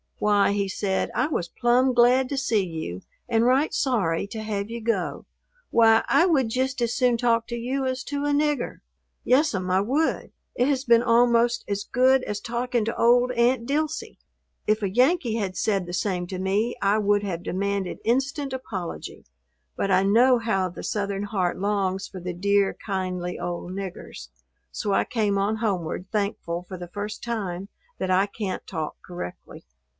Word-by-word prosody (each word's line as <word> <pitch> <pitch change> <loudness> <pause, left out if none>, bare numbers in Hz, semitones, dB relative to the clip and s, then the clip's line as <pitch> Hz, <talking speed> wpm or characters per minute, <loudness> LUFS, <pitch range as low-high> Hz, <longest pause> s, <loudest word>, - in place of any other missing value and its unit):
"Why," 205 -1 +3
he 200 -1 0
said, 190 0 -1
"I 255 - +2
was 185 - -2
plumb 250 +4 +2
glad 245 +2 +4
to 280 - -2
see 230 -6 +1
you 160 - -5 0.3
and 230 0 +2
right 265 +5 +3
sorry 200 -9 0
to 220 +1 -6
have 210 -1 -3
you 235 +1 -5
go. 230 +1 -2 0.5
Why, 225 -1 +5
I 340 - +4
would 270 -9 +2
jist 260 +3 -1
as 235 -1 +1
soon 250 -2 +3
talk 230 -1 +1
to 235 - -4
you 260 +3 -2
as 260 0 -2
to 285 0 -3
a - - +1
nigger. 290 -2 0 0.4
Yes'm, 250 -9 +2
I 190 +1 +3
would. 275 +10 0 0.2
It 250 - +2
has 275 -1 0
been 235 -2 +5
almost 235 0 +3
as 200 0 -2
good 260 +1 +3
as 210 0 -3
talking 240 0 -1
to 230 - -3
old 245 +2 +4
Aunt 240 0 +2
Dilsey." 305 +2 -2 0.5
If 215 0 +2
a 195 - +1
Yankee 250 - +2
had 195 -5 -2
said 195 -4 0
the 175 - -6
same 180 -1 -1
to 185 0 -5
me 205 +5 0
I 200 +2 +3
would 205 0 +2
have 175 -4 -4
demanded 195 0 -2
instant 270 +3 0
apology, 200 -10 -6 0.5
but 195 - -1
I 185 0 +4
know 240 +6 +5
how 195 -5 0
the 175 - -9
Southern 200 -1 -2
heart 190 -4 -1
longs 195 -1 -1
for 190 - -9
the 180 0 -4
dear, 200 +2 +2
kindly 185 -3 -3
old 175 0 -4
"niggers," 185 - -7 0.4
so 205 - -2
I - - +3
came 210 -4 0
on 205 +3 0
homeward, 185 -6 -2
thankful 200 -5 -2
for 185 - -7
the 175 0 -7
first 205 +3 -6
time 200 -5 -4 0.3
that 185 - -1
I 185 +2 +4
can't 200 -2 -5
talk 160 -4 -4
correctly. 175 - -8
215 Hz, 180 wpm, -25 LUFS, 190-245 Hz, 0.5 s, Why